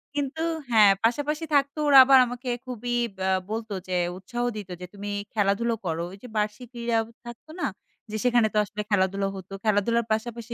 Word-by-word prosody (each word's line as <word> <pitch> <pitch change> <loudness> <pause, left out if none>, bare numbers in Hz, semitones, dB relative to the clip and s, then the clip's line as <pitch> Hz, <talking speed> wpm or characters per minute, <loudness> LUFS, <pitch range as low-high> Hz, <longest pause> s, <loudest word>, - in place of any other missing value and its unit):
কিন্তু 290 +2 -2 0.3
হ্যাঁ, 210 -3 +7
পাশাপাশি 295 +7 0
থাকতো 280 +2 +2
ওরা 280 -1 +7
আবার 270 0 +7
আমাকে 245 +1 -6 0.2
খুবই 245 -1 -3 0.2
বা 190 0 -2 0.2
বলতো 220 -1 -4
যে 185 - -2 0.2
উৎসাহ 240 +6 -4
দিত 200 -3 -7
যে - - -5
তুমি 205 0 -6 0.2
খেলাধুলা 220 +3 +1
করো। 165 0 -1
ওইযে 200 +6 -11
বার্ষিক 210 +3 -2
ক্রীড়া 235 -1 -1 0.3
থাকতো 240 +6 -11
না? - - 0 0.5
যে 215 - -2
সেখানে 240 -3 +4
তো - - 0
আসলে 210 +2 -5
খেলাধুলা 195 0 +1
হতো। 190 0 -10
খেলাধুলার 220 +2 +2
পাশাপাশি 235 +1 -4
230 Hz, 170 wpm, -26 LUFS, 205-245 Hz, 0.5 s, হ্যাঁ